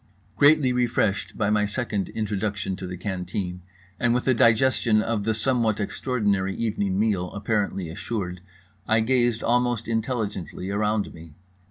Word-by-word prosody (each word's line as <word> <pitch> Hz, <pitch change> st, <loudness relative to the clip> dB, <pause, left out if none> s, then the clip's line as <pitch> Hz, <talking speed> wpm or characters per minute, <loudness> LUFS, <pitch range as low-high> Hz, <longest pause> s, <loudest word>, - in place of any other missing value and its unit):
Greatly 145 Hz, -3 st, +5 dB
refreshed 115 Hz, -5 st, 0 dB
by 105 Hz, -2 st, +1 dB
my 105 Hz, -1 st, +3 dB
second 105 Hz, -2 st, -2 dB
introduction 100 Hz, -3 st, -2 dB
to 95 Hz, 0 st, -6 dB
the 90 Hz, 0 st, -6 dB
canteen, 90 Hz, -1 st, -4 dB, 0.4 s
and 120 Hz, -1 st, +2 dB
with 125 Hz, -, 0 dB
the 130 Hz, -, +4 dB
digestion 115 Hz, -1 st, +4 dB
of 110 Hz, -2 st, -1 dB
the 110 Hz, -, +2 dB
somewhat 115 Hz, -2 st, +1 dB
extraordinary 100 Hz, -4 st, 0 dB
evening 100 Hz, -4 st, -1 dB
meal 100 Hz, -5 st, 0 dB
apparently 100 Hz, -3 st, -1 dB
assured, 90 Hz, +1 st, -4 dB, 0.5 s
I 110 Hz, 0 st, +3 dB
gazed 120 Hz, -1 st, +1 dB
almost 120 Hz, -1 st, +1 dB
intelligently 110 Hz, -5 st, -3 dB
around 105 Hz, +1 st, 0 dB
me. 80 Hz, -2 st, -13 dB
105 Hz, 140 wpm, -25 LUFS, 95-115 Hz, 0.5 s, Greatly